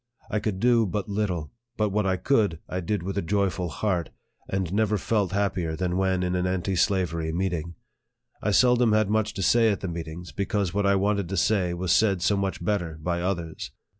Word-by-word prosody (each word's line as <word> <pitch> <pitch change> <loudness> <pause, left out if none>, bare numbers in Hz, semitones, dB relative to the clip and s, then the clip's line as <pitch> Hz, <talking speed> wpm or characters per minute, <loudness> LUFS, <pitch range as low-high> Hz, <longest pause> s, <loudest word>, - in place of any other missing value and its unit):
I 105 - +1
could 105 -3 -2
do 120 -1 +4
but 100 +1 -3
little; 100 -7 -2 0.3
but 105 -1 +1
what 100 0 0
I 95 -1 +1
could, 105 - +2
I 90 - -3
did 95 +1 -2
with 95 +2 -2
a - - -1
joyful 95 -1 0
heart, 90 -3 -1 0.4
and 95 -2 -2
never 105 0 +2
felt 100 -1 0
happier 95 -5 -1
than 90 +1 -1
when 95 -1 +1
in 90 0 -1
an 90 0 0
anti 95 +1 -1
slavery 85 -4 +1
meeting. 85 -1 -2 0.7
I 105 - 0
sel 125 +4 +5
dom 120 -3 +3
had 110 -1 +2
much 110 0 0
to 95 - -2
say 115 +5 +4
at 100 - -3
the 95 - -3
meetings, 85 0 -6
because 100 -2 -1
what 100 0 +1
I 100 - +4
wanted 100 -2 0
to 95 - -2
say 90 -2 +2
was 90 0 -1
said 100 -4 +3
so 100 +2 +3
much 95 -3 -2
better 90 -6 -1
by 85 +2 -2
others. 85 -3 -3
95 Hz, 210 wpm, -26 LUFS, 90-105 Hz, 0.7 s, sel